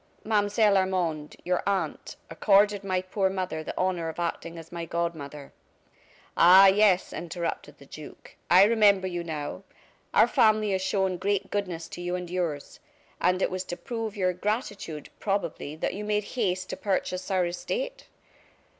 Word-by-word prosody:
"Mademoiselle 205 -1 +3
Armande, 175 -5 -1
your 180 0 +1
aunt, 190 -6 -2 0.2
accorded 205 0 +3
my 185 -1 -1
poor 190 +1 0
mother 185 -4 -3
the - - -7
honor 180 -3 0
of 160 - -8
acting 170 0 -3
as 165 -1 -11
my 170 -1 -5
godmother 160 -4 -4 0.4
" - - -30
"Ah, 185 +3 +8
yes," 195 -1 +4
interrupted 170 -3 -5
the 140 - -15
duke. 150 +2 -12
"I 180 +2 +8
remember 205 -3 +4
you 175 -2 -3
now. 155 +1 -5 0.5
Our - - +6
family 215 -1 +3
has 190 -1 0
shown 190 -1 0
great 200 +1 -1
goodness 180 -5 -3
to 175 - -8
you 175 0 -2
and 180 -1 -6
yours. 170 -6 -3 0.4
And 180 +1 +2
it - - 0
was 185 0 -3
to 175 - -5
prove 225 -4 -5
your 185 -2 +1
gratitude, 205 - -4
probably, 175 -7 -2
that 155 - -2
you 205 +3 -5
made 210 0 0
haste 185 -6 -1
to - - -5
purchase 185 -1 -2
our 185 -2 +2
estate!" - - -4
185 Hz, 165 wpm, -27 LUFS, 170-200 Hz, 0.5 s, Ah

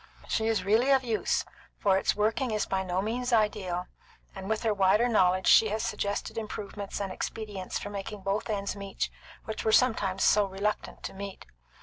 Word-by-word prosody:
She 220 - 0
is 220 -5 +1
really 225 +6 +3
of 270 -1 +5
use, 225 -3 0 0.3
for 195 -2 +3
its 190 - +1
working 220 +5 +1
is 215 -2 0
by 190 - -1
no 185 0 -1
means 245 +4 -2
ideal, 205 -5 +1 0.5
and 195 +1 -7
with 220 +1 -1
her 220 -2 +2
wider 200 +4 +4
knowledge 185 -5 +3
she 220 - +7
has 215 +2 -1
suggested 205 -1 -2
improvements 205 -2 -6
and 195 -2 -3
expedients 205 -1 -4
for 205 - -6
making 205 +1 -6
both 195 +4 -2
ends 200 -2 -2
meet 200 -1 -4 0.3
which 220 - -4
were 220 - +2
sometimes 205 -6 +3
so 210 -1 +5
reluctant 200 +2 -3
to - - -5
meet. 195 0 -7
205 Hz, 185 wpm, -29 LUFS, 195-220 Hz, 0.5 s, she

